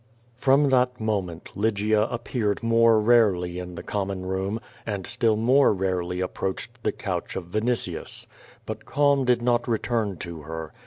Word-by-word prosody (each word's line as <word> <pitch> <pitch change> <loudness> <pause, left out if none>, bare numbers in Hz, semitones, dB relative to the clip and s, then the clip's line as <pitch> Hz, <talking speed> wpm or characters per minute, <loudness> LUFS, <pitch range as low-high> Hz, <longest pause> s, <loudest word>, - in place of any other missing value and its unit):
From 135 +3 +3
that 125 -1 +2
moment, 95 -6 -3
Lygia 105 +1 +1
api^earcd 115 -3 -2
more 115 -1 +5
rarely 100 -6 +3
in 90 -1 -7
the - - -7
common 95 -2 -3
room, 95 +3 -2 0.2
and 100 -4 -4
still 115 -2 +1
more 125 +6 +4
rarely 90 -1 -1
approaced 95 +1 -3
tho - - 0
couch - - -4
of 90 -2 -6
Vinitius. 115 +4 -2 0.4
lUit 110 0 -6
calm 140 -2 +2
did 120 -1 +2
not 120 0 +2
return 115 -4 -1
to 85 -2 -7
her. 80 +1 -7
110 Hz, 150 wpm, -25 LUFS, 95-120 Hz, 0.4 s, more